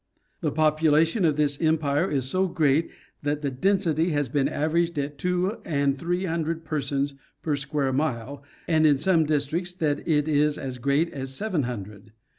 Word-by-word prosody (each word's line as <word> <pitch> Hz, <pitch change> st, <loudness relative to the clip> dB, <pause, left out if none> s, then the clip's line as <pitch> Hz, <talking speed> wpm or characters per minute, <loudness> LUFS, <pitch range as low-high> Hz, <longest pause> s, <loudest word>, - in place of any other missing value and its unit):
The 155 Hz, -4 st, -1 dB
population 155 Hz, +4 st, +3 dB
of 155 Hz, -3 st, +3 dB
this 145 Hz, -1 st, 0 dB
empire 155 Hz, +1 st, +1 dB
is 135 Hz, -3 st, 0 dB
so 185 Hz, +7 st, +2 dB
great 160 Hz, -3 st, +2 dB, 0.3 s
that 145 Hz, +1 st, -2 dB
the 140 Hz, -, -1 dB
density 170 Hz, +2 st, +1 dB
has 145 Hz, -5 st, 0 dB
been 140 Hz, +1 st, +1 dB
averaged 165 Hz, +2 st, 0 dB
at 145 Hz, 0 st, -3 dB
two 180 Hz, +4 st, 0 dB
and 140 Hz, -3 st, 0 dB
three 175 Hz, +5 st, -2 dB
hundred 165 Hz, -1 st, -2 dB
persons 140 Hz, -2 st, -1 dB, 0.3 s
per 150 Hz, -3 st, 0 dB
square 140 Hz, -1 st, -1 dB
mile, 135 Hz, -1 st, -2 dB, 0.3 s
and 155 Hz, -2 st, +4 dB
in 145 Hz, -2 st, +4 dB
some 160 Hz, +2 st, +2 dB
districts 155 Hz, +5 st, -1 dB
that 150 Hz, -4 st, 0 dB
it 150 Hz, -2 st, +2 dB
is 150 Hz, -1 st, +2 dB
as 130 Hz, -2 st, -6 dB
great 140 Hz, +6 st, +1 dB
as 135 Hz, -1 st, -4 dB
seven 195 Hz, -5 st, -1 dB
hundred. 105 Hz, -2 st, -8 dB
150 Hz, 170 wpm, -25 LUFS, 140-165 Hz, 0.3 s, and